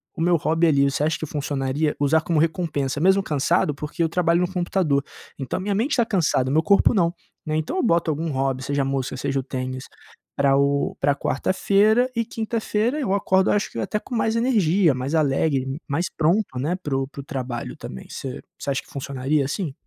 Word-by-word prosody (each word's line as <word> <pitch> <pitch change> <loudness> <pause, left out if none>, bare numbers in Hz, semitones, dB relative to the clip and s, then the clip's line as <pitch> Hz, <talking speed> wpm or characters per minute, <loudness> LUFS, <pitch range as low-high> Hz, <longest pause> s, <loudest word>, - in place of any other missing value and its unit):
o - - -5
meu 175 +1 +3
hobby 165 +1 +2
ali. 140 -3 +4
Você 140 +1 +1
acha 155 +1 +1
que - - -4
funcionaria 145 0 -1
usar 145 +3 +3
como 165 0 -1
recompensa, 155 -4 -1
mesmo 190 +4 +4
cansado? 150 +1 +1
Porque 150 +3 -3
eu 165 - +1
trabalho 170 0 +2
no 180 +1 -1
computador, 175 -6 +1 0.4
então 135 -3 -3
a - - -3
minha 200 +2 -1
mente 230 +9 0
está 240 -4 +3
cansada, 155 - +1
meu 155 +3 +4
corpo 200 +4 +4
não, 170 -6 +2 0.3
né. 155 -1 -2
Então 155 - -2
eu - - +1
boto 170 -7 +2
algum 160 +2 -2
hobby, 135 -2 -1
seja 140 +1 -1
a - - -2
música 135 -1 -2
ou - - -7
seja 135 +1 -1
o - - -3
tênis, 130 0 -5 0.5
pra 140 -1 +3
o 140 0 +1
pra 140 0 +3
quarta-feira 200 - +2
e 230 - +1
quinta-feira 225 +3 -1
eu 225 -10 0
acordo, 190 -1 +2
acho 205 - 0
que, - - -5
até 115 - -1
com 245 - -7
mais 225 0 +1
energia, 200 - +3
mais 130 +4 -2
alegre, 140 -1 0
mais 160 +5 -1
pronto, 165 -3 +1
né, 155 +7 0
para 150 -7 -4
o 135 0 -1
para 140 - -9
o - - -12
trabalho 130 -3 -5
também. 65 - -9
Você 130 -1 -6 0.2
você - - -4
acha 135 - -1
que - - -20
funcionaria 140 +1 -1
assim? 150 +2 -3
155 Hz, 215 wpm, -23 LUFS, 135-185 Hz, 0.5 s, ali